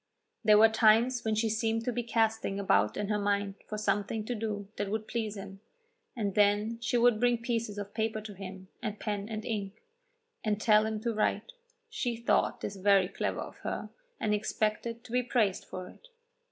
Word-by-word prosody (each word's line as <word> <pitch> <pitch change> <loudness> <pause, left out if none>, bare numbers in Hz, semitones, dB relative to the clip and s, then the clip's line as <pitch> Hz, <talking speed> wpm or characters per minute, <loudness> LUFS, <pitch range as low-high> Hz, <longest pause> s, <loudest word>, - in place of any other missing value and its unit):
There 215 -1 +7
were 220 +1 +8
times 230 +3 +4
when 220 -1 +1
she 220 +1 +1
seemed 225 +1 0
to 250 - +1
be 240 +1 -1
casting 225 -3 0
about 195 -1 +2
in 205 - -1
her 210 -1 +1
mind 200 -1 0
for 215 - -4
something 210 +1 -1
to 245 - -2
do 210 -3 -3
that 205 -1 -2
would 215 +1 -3
please 220 -3 -3
him, 195 0 -8 0.6
and 205 -5 -1
then 210 +3 +2
she 240 +1 +1
would 235 -2 +4
bring 245 0 +3
pieces 230 -3 -2
of 205 0 -6
paper 220 0 -1
to 215 -1 -8
him, 190 0 -9
and 215 -1 -4
pen 205 -1 -3
and 215 -1 -4
ink, 205 -3 -4 0.6
and 210 -2 0
tell 215 0 +4
him 220 -1 -2
to 235 0 -1
write. 215 - 0 0.4
She 350 - -2
thought 235 - +1
this 200 -1 -4
very 195 -1 +4
clever - - -2
of - - -8
her, - - -5 0.3
and 210 - +1
expected 215 +2 -1
to - - -13
be 250 +1 +2
praised 230 -6 +1
for 185 0 -7
it. - - -17
215 Hz, 195 wpm, -30 LUFS, 205-230 Hz, 0.6 s, were